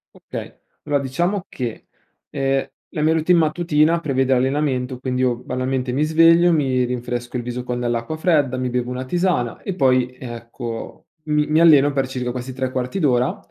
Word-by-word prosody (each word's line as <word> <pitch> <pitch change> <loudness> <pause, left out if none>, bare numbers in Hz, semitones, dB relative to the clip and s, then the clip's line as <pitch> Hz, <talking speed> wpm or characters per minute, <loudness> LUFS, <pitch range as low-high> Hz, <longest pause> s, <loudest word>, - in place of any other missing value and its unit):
Okay. - - -8 0.3
Allora 145 -1 +1
diciamo 175 +9 -1
che, 120 -4 -5 0.4
ehm, 135 -1 0 0.2
la 155 - -3
mia 160 +1 +3
routine 165 +2 +3
mattutina 160 0 +2
prevede 135 -4 +1
l'allenamento, 130 -1 0
quindi 130 -1 -2
io 125 -2 +2
banalmente 130 +1 -2
mi 140 +4 +1
sveglio, 165 +2 +5
mi 130 -4 +1
rinfresco 120 0 -4
il 120 - -2
viso 125 +1 -4
con 125 -1 -3
dell'acqua 120 +5 -2
fredda, 150 -6 +1
mi 125 0 -1
bevo 125 0 -2
una 125 +1 -4
tisana, 175 -6 -1
e 195 - -4
poi 130 -5 +2
ecco 115 -1 -7 0.2
mi 150 -1 +1
mi 155 +1 +3
alleno 145 -4 +6
per 135 -2 0
circa 125 -2 -3
questi 125 +1 -6
3/4 130 +5 -3
d'ora; 125 -4 +2
130 Hz, 170 wpm, -21 LUFS, 125-155 Hz, 0.4 s, alleno